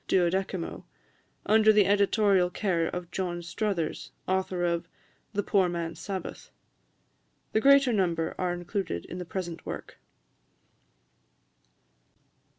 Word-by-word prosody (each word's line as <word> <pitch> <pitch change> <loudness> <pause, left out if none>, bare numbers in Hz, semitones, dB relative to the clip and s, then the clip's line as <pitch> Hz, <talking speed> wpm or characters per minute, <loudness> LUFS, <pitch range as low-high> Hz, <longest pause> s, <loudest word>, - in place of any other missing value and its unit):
12mo, 185 0 0 0.6
under 215 0 +6
the 210 -2 +5
editorial 200 -2 +3
care 175 -3 0
of 175 -1 -5
John 175 -2 -3
Struthers, 175 -3 -2 0.2
author 185 -1 0
of 170 0 -1 0.5
"The 205 0 0
Poor 190 -3 +3
Man's 170 -1 -4
Sabbath." 190 -3 -6 1.0
The 220 - +2
greater 275 -2 +6
number 170 -5 0
are 180 -1 0
included 175 - -3
in 180 - -7
the 180 - -5
present 170 -1 -5
work. - - -7
185 Hz, 110 wpm, -28 LUFS, 175-200 Hz, 1.0 s, under